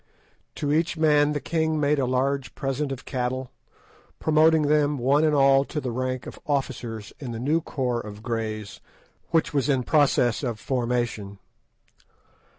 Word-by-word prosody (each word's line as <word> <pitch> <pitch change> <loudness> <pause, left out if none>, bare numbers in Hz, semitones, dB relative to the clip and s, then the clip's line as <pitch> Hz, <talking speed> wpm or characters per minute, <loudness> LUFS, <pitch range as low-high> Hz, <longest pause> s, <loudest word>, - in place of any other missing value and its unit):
To 145 -1 -1
each 165 +2 +1
man 150 -2 +3
the 145 - -1
king 160 0 0
made 145 0 +2
a 130 - +1
large 135 +2 -1
present 135 0 -2
of 135 - -6
cattle, 130 0 -3 0.7
promoting 155 0 +4
them 150 0 +2
one 135 +5 +3
and 155 -1 +3
all 135 -1 +5
to 155 - -4
the 130 -4 -3
rank 130 +1 -3
of - - -9
officers 120 -7 -3
in 125 -5 -6
the 115 - -5
new 150 +7 +1
corps 125 -6 -2
of 105 0 -10
Greys 110 -3 -4 0.5
which 165 -2 +1
was 140 0 +1
in 130 -3 +2
process 135 -5 +2
of 120 -6 -3
formation. 120 -6 -2
135 Hz, 155 wpm, -25 LUFS, 120-150 Hz, 0.7 s, all